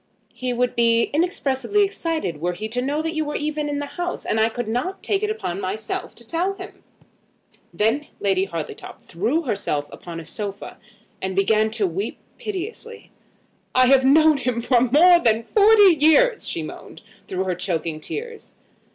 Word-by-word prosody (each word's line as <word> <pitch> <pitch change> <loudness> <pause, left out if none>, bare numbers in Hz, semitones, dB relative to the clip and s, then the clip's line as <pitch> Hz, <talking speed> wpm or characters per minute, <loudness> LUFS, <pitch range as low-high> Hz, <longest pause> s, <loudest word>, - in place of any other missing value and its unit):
"He 255 -1 -3
would 245 0 0
be 230 0 +3
inexpressibly 330 +2 +1
excited 330 - -2
were 175 +1 0
he 210 +5 -5
to 245 +2 -2
know 290 +4 -1
that 320 0 -2
you 315 -1 0
were 295 0 -4
even 300 0 -2
in 290 - -2
the 290 - -3
house. 350 +4 -5
And 220 - 0
I 220 +1 +3
could 240 0 -5
not 250 - -3
take 400 -1 0
it 425 - 0
upon 200 - -3
myself 205 +3 -4
to 235 - -10
tell 345 - -1
him." 380 0 -11 0.9
Then 230 +8 0
Lady 195 -1 +1
Hartletop 165 -5 -7
threw 230 - -1
herself 200 - -2
upon 170 -1 -8
a 165 - -9
sofa, 200 +4 -7 0.4
and 190 0 -3
began 215 +3 +3
to 220 -2 0
weep 195 +5 -3 0.2
piteously. 440 +4 -7 0.6
"I 255 0 +6
have 265 +1 +5
known 310 +3 +5
him 250 -3 -1
for 240 0 +3
more 320 +8 +6
than 230 -5 +2
forty 410 - +6
years," 375 +12 +4
she - - -3
moaned, - - -10 0.2
through 185 0 -2
her 185 -1 -1
choking 165 -3 -3
tears. 455 - -7
255 Hz, 175 wpm, -22 LUFS, 205-330 Hz, 0.9 s, I